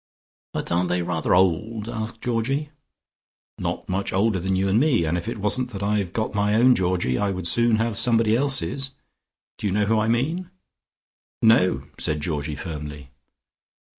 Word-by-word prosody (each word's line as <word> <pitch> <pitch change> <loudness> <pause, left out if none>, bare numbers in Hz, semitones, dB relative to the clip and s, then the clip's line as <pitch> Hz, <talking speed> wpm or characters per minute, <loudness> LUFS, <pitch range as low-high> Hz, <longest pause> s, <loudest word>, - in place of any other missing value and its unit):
"But - - -4
aren't 90 +1 +1
they 90 0 0
rather 85 -1 0
old?" 105 +5 +1
asked 115 -1 -5
Georgie. 135 +5 -1 0.9
"Not - - -3
much 95 +2 -2
older 100 0 +1
than 95 +2 -1
you 95 +1 +1
and 100 +3 +3
me, 130 - +3
and 80 +2 0
if 85 +4 -4
it 115 - -3
wasn't 115 +5 0
that 100 0 -5
I've 100 -3 0
got 110 +2 -2
my 105 +1 +1
own 125 +3 +6
Georgie, 90 - 0
I 100 - +1
would 95 -2 -4
soon 115 +5 +3
have 115 0 -1
somebody 115 -2 +3
else's. 135 0 0 0.6
Do - - -1
you - - 0
know 105 +1 +2
who 110 +1 +2
I 110 - +1
mean?" 155 +11 0 0.9
"No!" 110 -5 +4 0.2
said 75 0 +1
Georgie 75 -1 -3
firmly. 75 -3 -7
105 Hz, 170 wpm, -24 LUFS, 90-115 Hz, 0.9 s, own